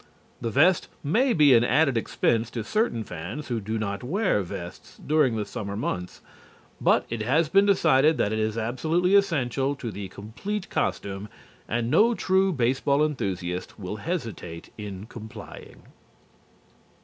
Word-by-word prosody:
The 115 - -1
vest 160 +9 +4 0.2
may 235 - +2
be 150 - +6
an 115 -1 +6
added 140 +2 +3
expense 115 0 +1
to 115 -2 -4
certain 210 - 0
fans 110 - -7
who 120 -2 -1
do 110 +3 -3
not 100 0 -3
wear 185 - +1
vests 85 -1 -8
during 150 -6 +2
the 105 -1 -2
summer 100 -1 -5
months, 90 -4 -4 0.6
but - - +3
it 115 -2 -2
has 150 +8 +2
been 195 +3 +5
decided 155 -6 +4
that 105 - +1
it 110 - -1
is 110 0 -1
absolutely 160 - 0
essential 140 - +2
to 120 -5 -5
the 100 0 -6
complete 175 - -6
costume, 100 +1 -2 0.4
and 120 +1 -1
no 235 +2 +5
true 190 -1 +2
baseball 140 +1 +2
enthusiast 95 -11 -3
will 100 0 -5
hesitate 115 - -5
in 100 -2 -7
complying. 110 -1 -11
120 Hz, 150 wpm, -26 LUFS, 105-155 Hz, 0.6 s, be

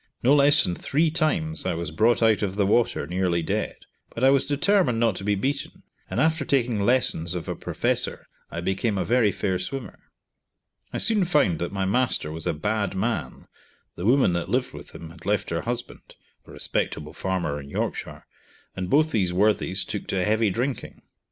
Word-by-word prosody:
No 130 +4 +5
less 145 +1 +6
than 90 - -1
three 155 - 0
times 120 - -1
I - - -1
was 85 -2 -4
brought 115 +8 +2
out 110 -3 +4
of 100 -2 -2
the 100 -1 +2
water 110 -6 +1
nearly 90 0 0
dead; - - -2 0.4
but 115 - -3
I 135 - +7
was 140 -1 +2
determined 145 - +2
not 115 -4 +2
to - - -6
be 105 +1 +1
beaten, 135 +8 -3 0.3
and - - -2
after 160 -1 +2
taking 125 -5 +1
lessons 100 -7 +1
of 85 - -5
a - - -3
professor - - -2 0.2
I 85 - -5
became 95 +4 -1
a - - -1
very 120 -3 +3
fair 95 -2 -1
swimmer. 135 +7 -6 0.9
I - - -3
soon 215 -4 +3
found 145 - +2
that 85 - -3
my 95 -1 -1
master 105 -6 +1
was 80 +1 -5
a - - +1
bad 100 +4 -1
man, 110 +4 -3 0.5
the 90 - -3
woman 130 -7 +4
that 85 +1 -2
lived 125 +3 0
with 75 -1 -10
him 80 -1 -9
had 85 - -15
left 105 -1 0
her 85 0 -1
husband 120 +1 -6 0.3
(a - - -12
respectable 75 0 -2
farmer 85 -6 -2
in 70 - -12
Yorkshire), - - -4 0.5
and 90 -1 -4
both 155 +3 +3
these 95 -5 +1
worthies 95 -1 +2
took 105 - -5
to 90 -2 0
heavy 110 0 +2
drinking. 120 +5 -4
105 Hz, 190 wpm, -25 LUFS, 90-130 Hz, 0.9 s, I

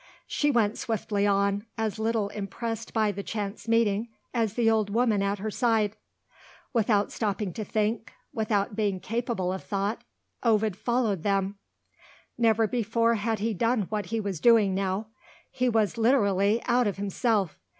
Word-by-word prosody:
She 295 - 0
went 230 -5 +2
swiftly 210 -2 -1
on, 200 +1 +1
as 220 -1 -2
little 220 -2 0
impressed 215 +2 -5
by 215 -2 +2
the 200 0 -5
chance 205 +1 -5
meeting 225 -1 +2 0.2
as 225 -4 0
the 235 -2 +2
old 220 -2 +3
woman 220 -1 +2
at 200 +1 0
her 215 +2 -4
side. 220 -3 +1 0.8
Without 210 -3 +2
stopping 205 -3 -2
to 215 - -4
think 215 +2 -1 0.2
without 215 -2 0
being 205 -3 0
capable 225 -4 -2
of 190 - -6
thought 200 +2 -2 0.4
Ovid 220 -4 +2
followed 230 -4 0
them. 195 +1 0 0.8
Never 225 -1 +3
before 230 +1 +1
had 225 0 -1
he 220 +2 -1
done 230 +2 +1
what 210 -3 -2
he 225 +1 -1
was 200 -6 -3
doing 215 -1 +5
now; 195 +3 -2 0.4
he 250 0 +1
was, 225 0 +1
literally, 210 -3 +3
out 245 -1 +3
of 200 - -2
himself. 200 -1 0
215 Hz, 155 wpm, -27 LUFS, 200-230 Hz, 0.8 s, doing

